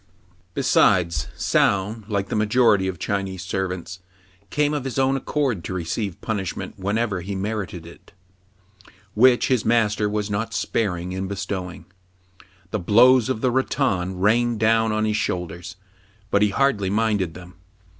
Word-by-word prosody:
Besides, 85 -5 +2
Soun, 100 +2 +1
like 100 -2 -2
the - - -2
majority 105 -2 +3
of 95 -2 -3
Chinese 95 +1 -3
ser 95 0 -1
vants, 90 0 -7 0.5
came 150 +4 +1
of 145 -3 -2
his 135 -2 -5
own 135 0 +2
accord 135 - -1
to 95 - -4
receive 90 +2 -3
punish 100 -6 -3
ment - - -7
whenever 100 0 -1
he 100 +3 -5
merited 95 -4 -4
it, 85 - -15 1.0
which 125 +2 +4
his 125 -5 +2
master 110 -2 +2
was 105 -1 -2
not 105 +2 -3
sparing 90 -5 -1
in 95 +1 -3
bestowing. 95 -2 -5 0.9
The 110 - -1
blows 120 +6 +5
of 110 -4 -2
the 130 - +2
rattan 105 -8 0
rained 115 +3 +2
down 110 0 +3
on 110 0 0
his 105 -1 0
shoulders, 90 -2 -4 0.6
but 100 - +3
he 105 - +4
hardly 105 -4 +1
minded 105 -5 0
them. 90 0 -11
105 Hz, 150 wpm, -23 LUFS, 95-115 Hz, 1.0 s, blows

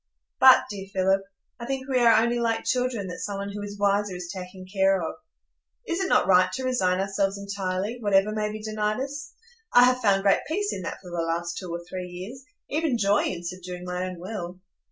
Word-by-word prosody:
But, 260 0 +8
dear 195 -1 -6
Philip, 190 +1 +2 0.4
I 235 - -6
think 265 0 -3
we 260 -2 +2
are 230 -2 +6
only 240 +1 0
like 225 -1 0
children 250 -5 0
that 180 - -6
some 200 -1 -4
one 200 0 -4
who 205 +1 -6
is 205 0 -6
wiser 200 -1 +1
is 180 -1 -6
taking 185 0 -8
care 195 0 +2
of. 165 - -3 0.7
Is 340 +1 -1
it 380 - 0
not - - +4
right 185 -1 +5
to 260 - -3
resign 190 -8 +1
ourselves 195 0 0
entirely, 200 +2 -3
whatever 205 -1 +3
may 215 0 -1
be 215 0 -7
denied 215 0 -1
us? 285 +2 -5 0.4
I 245 - +7
have 255 0 +3
found 195 -3 +3
great 200 -1 +4
peace 405 +6 -1
in 190 - -5
that 175 - -5
for 180 - -10
the 175 - -4
last 170 +1 -2
two 185 -3 -7
or 170 0 -4
three 180 0 -5
years, 190 +9 -8 0.2
even 305 -4 0
joy 205 -1 +2
in 175 -2 -3
subduing 180 0 -6
my 180 0 -3
own 180 - -8
will." 180 -1 -6
200 Hz, 215 wpm, -26 LUFS, 185-235 Hz, 0.7 s, But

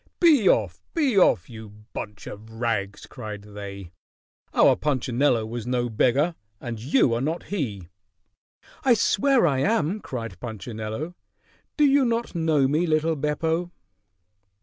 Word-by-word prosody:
"Be 300 - +5
off! - - +1
Be 285 -8 +2
off! 180 - +4
You 110 -2 -10 0.2
bunch 105 -1 -7
of 110 +2 -9
rags!" 110 -4 -2
cried 105 -4 -8
they. 100 -3 -9 0.6
"Our - - +5
Punchinello 130 -4 +1
was 115 +1 -6
no 125 -1 0
beggar, 135 +9 +2 0.3
and 115 -2 -6
you 125 0 +2
are 115 - -1
not 160 +5 -2
he." 105 - -3 1.0
"I 255 -3 +5
swear 245 +2 +3
I 140 -5 +2
am!" 195 +2 +1
cried 115 - -6
Punchinello. 110 - -5 0.6
"Do 300 - +4
you 280 0 +4
not 235 -1 -1
know 160 -5 +2
me, 155 +5 +1
little 160 +1 +1
Beppo?" 160 +4 -1
130 Hz, 135 wpm, -25 LUFS, 110-170 Hz, 1.0 s, Be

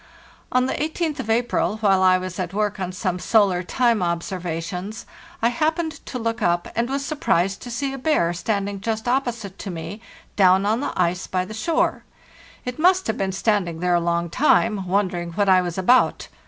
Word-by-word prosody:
On 255 0 +3
the 265 - -1
18th 315 0 -2
of 235 -4 -5
April, 230 -1 +1
while 195 -3 +3
I 185 0 +5
was 185 0 -6
at 185 +1 -3
work 210 -1 -1
on 185 -1 -3
some 185 0 -2
solar 200 -4 +3
time 235 +3 +1
observations, 175 +2 -3 0.4
I 230 - +5
happened 315 +4 -1
to 255 - -4
look 230 0 -2
up, 175 -2 +1
and 235 +2 0
was 275 +1 -2
surprised 195 - 0
to 245 - -8
see 270 +3 -2
a 270 - -6
bear 250 - +1
standing 200 +2 -2
just 220 +1 -3
opposite 240 -6 -2
to - - -6
me 170 +5 -6 0.3
down 190 0 +5
on 220 +3 +1
the 285 - -2
ice 180 +1 0
by 185 -1 -1
the 215 - -8
shore. 280 +9 0 0.6
It 250 +3 -5
must 365 +3 +4
have 220 - -1
been 195 -1 0
stand 195 -1 +1
ing 165 -1 -7
there 180 0 +1
a 175 - +4
long 170 0 -1
time, 215 - +2
wondering 180 -3 -1
what 200 +3 +1
I 185 -1 +6
was 175 -1 -4
about. 245 +7 +3
200 Hz, 195 wpm, -22 LUFS, 180-240 Hz, 0.6 s, I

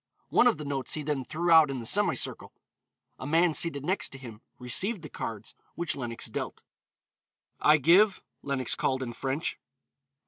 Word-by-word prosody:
One 245 - +4
of 240 - +2
the 150 - -7
notes 140 -2 -2
he 155 - -4
then 145 -2 -2
threw 170 +6 -2
out 160 -3 +7
in 135 -2 -3
the 115 - -7
semicircle. - - 0 0.7
A 130 - -6
man 165 +2 +3
seated 145 -4 0
next 190 +4 0
to - - -8
him 115 -4 -11 0.2
received 175 - 0
the 150 - -8
cards 110 -4 -6 0.2
which 170 -1 -1
Lenox 120 -3 -4
dealt. - - -5 1.0
"I 150 0 +5
give," 185 +8 +4 0.2
Lenox 135 -4 -1
called 130 0 -1
in 120 -2 -6
French. 135 +6 -3
145 Hz, 170 wpm, -28 LUFS, 130-165 Hz, 1.0 s, out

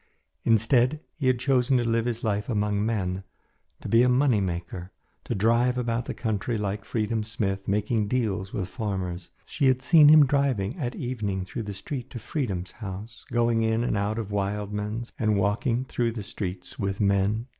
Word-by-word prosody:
Instead, 120 +5 +3
he 140 -4 -2
had 130 -1 +4
chosen 130 0 +2
to 120 - +1
live 115 0 +1
his 120 -1 -3
life 105 -1 -1
among 105 -2 0
men, 95 -4 -1 0.6
to - - -6
be 115 +1 +5
a 125 - +4
money 125 -4 +3
maker, 90 0 -4 0.3
to 120 - -3
drive 115 +4 +2
about 120 -1 -1
the - - -4
country 110 0 -1
like 100 -1 -3
Freedom 110 0 -1
Smith, 100 -3 -3
making 105 +1 +1
deals 105 -5 -1
with 95 -3 -3
farmers. 95 -6 -4 0.2
She 140 - 0
had 130 0 +2
seen 155 +1 +7
him 155 -1 +8
driving 130 -7 +1
at 125 -4 -2
evening 105 -7 -3
through 115 +6 -5
the 100 - -5
street 125 +5 -6
to - - -7
Freedom's 100 - -3
house, 105 0 -8
going 115 -1 +2
in 110 +1 +1
and 120 - 0
out 105 +2 -1
of 110 -3 -4
Wildman's, 105 +3 -3
and 110 -2 +2
walking 115 +6 +1
through 120 -3 -1
the 110 -3 -5
streets 95 -2 -6
with 100 -1 -2
men. 100 +2 +2
110 Hz, 180 wpm, -26 LUFS, 100-120 Hz, 0.6 s, him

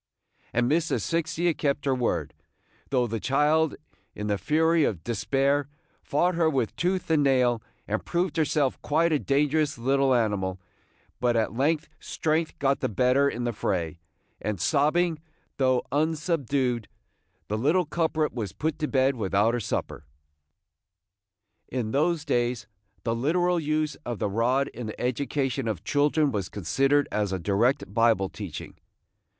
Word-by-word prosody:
And 120 +1 +1
Miss 165 +4 +1
Asphyxia 170 +1 0
kept 145 -1 -1
her 135 - +2
word, 125 -2 -1 0.6
though 125 -2 +2
the 115 -1 -3
child, 150 +5 +2 0.4
in 105 - -4
the 105 -1 0
fury 160 +1 +3
of 95 - -1
despair, 135 +5 0 0.3
fought 175 +5 +1
her 165 -2 +2
with 130 -7 -1
tooth 180 +1 -1
and 155 -2 +4
nail, 125 -4 +3 0.3
and 110 +1 -2
proved 175 -2 -1
herself 150 -4 +1
quite 165 +3 +2
a 150 - +2
dangerous 145 +1 +1
little 135 +2 +2
animal; 100 -5 0 0.6
but 120 -1 +2
at 110 -1 +1
length 145 +6 +1
strength 160 +1 -1
got 140 -1 +1
the - - -1
better 130 +5 +3
in 120 -1 -4
the 120 -1 -1
fray, 85 -5 -2 0.4
and, 105 -3 -2
sobbing, 155 - +2 0.4
though 130 -2 +2
unsubdued, 145 - 0 0.6
the 105 - -2
little 165 +9 +2
culprit 155 -1 0
was 110 -6 -4
put 155 0 -2
to 155 - 0
bed 135 -1 +2
without 105 +1 +1
her 120 - 0
supper. 110 - -4 1.6
In 120 -4 -3
those 160 +3 +1
days 120 -4 0 0.4
the 115 - 0
literal 175 +8 +1
use 155 -1 0
of 120 -2 -4
the 100 - -2
rod 125 +6 +1
in 120 -1 -7
the 110 - -7
education 130 0 -1
of 100 -5 -3
children 145 +3 +2
was 100 -5 -3
considered 135 - +1
as 105 -2 0
a 95 - -1
direct 105 - 0
Bible 115 -4 +3
teaching. 95 -8 -7
135 Hz, 150 wpm, -26 LUFS, 115-155 Hz, 1.6 s, and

